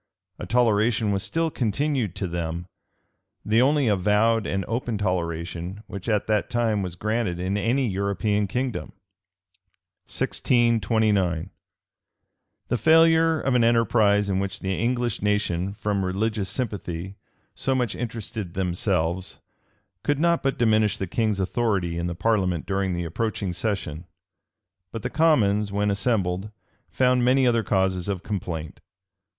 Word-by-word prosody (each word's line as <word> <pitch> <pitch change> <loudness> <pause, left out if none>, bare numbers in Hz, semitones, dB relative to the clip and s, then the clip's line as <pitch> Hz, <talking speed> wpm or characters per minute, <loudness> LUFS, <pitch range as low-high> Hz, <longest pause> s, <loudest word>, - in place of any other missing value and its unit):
A - - -6
toleration 110 -2 +2
was 100 -1 0
still 165 +8 -1
continued 125 - -1
to 95 - -2
them; 85 0 -4 0.8
the 110 +3 +3
only 140 0 +3
avowed 105 +2 +2
and 95 -1 -2
open 115 -1 -2
toleration 90 0 -3
which 100 +3 -7
at 105 -2 +1
that 105 -2 0
time 115 -4 +1
was 90 -3 -4
granted 105 -2 -1
in 95 +2 -1
any 120 +6 +1
European 100 +1 0
kingdom. 125 +3 -3 1.1
{1629.} 105 -7 +1 1.2
The 125 - +1
failure 165 +4 +5
of 135 - 0
an 125 -2 +4
enterprise 110 -3 +3
in 95 -1 0
which 100 -1 -3
the 95 0 -1
English 120 +1 -1
nation, 100 -2 0
from 105 -3 -1
religious 100 +2 -1
sympathy, 95 -6 -4 0.4
so 135 - -1
much 125 -5 0
interested 110 -5 -5
themselves, 90 -1 -1 0.6
could 145 +4 0
not 170 +2 +2
but 135 0 -1
diminish 110 -3 +2
the 95 - -2
king's 105 +2 -1
authority 95 -4 0
in 85 - -2
the 85 - -4
parliament 90 -4 0
during 95 -2 -1
the 85 0 -3
approaching 100 +1 -2
session: 90 -4 -3 0.9
but 115 -2 -6
the - - -3
commons, 105 -11 +3
when 105 +1 +1
assembled, 100 -2 0 0.4
found 125 -1 +2
many 130 +2 +4
other 120 -2 +3
causes 95 -3 0
of 100 -2 -3
complaint. 85 -7 -5
105 Hz, 135 wpm, -24 LUFS, 95-115 Hz, 1.2 s, failure